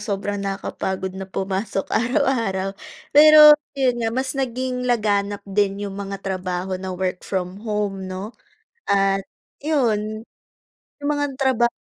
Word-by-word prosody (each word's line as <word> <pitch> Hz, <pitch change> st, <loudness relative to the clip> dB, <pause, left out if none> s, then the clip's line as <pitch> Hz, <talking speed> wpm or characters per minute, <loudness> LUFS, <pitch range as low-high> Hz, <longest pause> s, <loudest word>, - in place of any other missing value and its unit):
sobrang 205 Hz, 0 st, -3 dB
nakapagod 190 Hz, -1 st, -3 dB
na 190 Hz, 0 st, -7 dB
pumasok 195 Hz, +1 st, -2 dB
araw-araw. 230 Hz, -7 st, +1 dB, 0.4 s
Pero 300 Hz, 0 st, +10 dB, 0.2 s
yun 255 Hz, -3 st, +1 dB
nga 225 Hz, -, 0 dB
mas 260 Hz, +3 st, -2 dB
naging 255 Hz, -1 st, -2 dB
laganap 205 Hz, -3 st, 0 dB
din 195 Hz, 0 st, 0 dB
yung 200 Hz, -, -5 dB
mga 195 Hz, 0 st, -4 dB
trabaho 185 Hz, -1 st, -3 dB
na 190 Hz, -, -5 dB
work 185 Hz, -1 st, -2 dB
from 185 Hz, +1 st, -4 dB
home 205 Hz, -3 st, -3 dB
'no 190 Hz, +4 st, -6 dB, 0.6 s
at 195 Hz, 0 st, +3 dB, 0.4 s
yun, 220 Hz, -7 st, 0 dB, 0.8 s
yung 285 Hz, -, -2 dB
mga 290 Hz, -1 st, -1 dB
traba 255 Hz, -3 st, +3 dB
205 Hz, 125 wpm, -22 LUFS, 195-250 Hz, 0.8 s, Pero